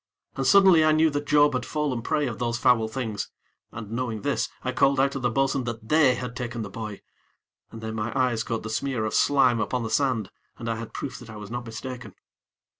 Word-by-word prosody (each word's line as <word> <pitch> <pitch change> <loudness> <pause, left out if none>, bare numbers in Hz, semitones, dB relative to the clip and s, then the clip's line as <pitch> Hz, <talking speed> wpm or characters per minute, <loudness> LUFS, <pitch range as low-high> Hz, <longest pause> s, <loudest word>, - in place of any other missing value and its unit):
And, 135 -1 -1
suddenly, 190 -2 +7
I 155 0 +4
knew 155 0 +4
that 145 0 -3
Job 145 -1 +5
had 125 -1 -1
fallen 145 -4 -2
prey 150 +4 0
of 120 -5 -4
those 120 -1 -1
foul 115 -2 +3
things, 110 -3 -4 0.4
and, 110 -2 -8
knowing 115 -3 -3
this, - - 0
I - - -1
called 135 0 +3
out 135 +1 +3
to 140 - -4
the 125 -1 +1
bo'sun 135 +1 0
that 115 -2 -6
they 150 -5 +5
had 125 0 -6
taken 120 -2 -4
the 100 - -7
boy, 105 -1 -6 0.7
and 115 - -10
then 110 0 -4
my 110 +1 -2
eyes 120 -3 +1
caught 115 -2 -3
the 110 - -5
smear 120 -1 -1
of 110 - -3
slime 130 -5 +4
upon 115 +3 -1
the 110 - -4
sand, 130 -8 +1 0.3
and 115 - -7
I 115 -1 -1
had 115 -1 -8
proof 130 -4 -5
that 120 - -12
I 110 - -9
was 105 0 -9
not 120 0 -5
mistaken. 115 -1 -7
120 Hz, 230 wpm, -25 LUFS, 115-135 Hz, 0.7 s, suddenly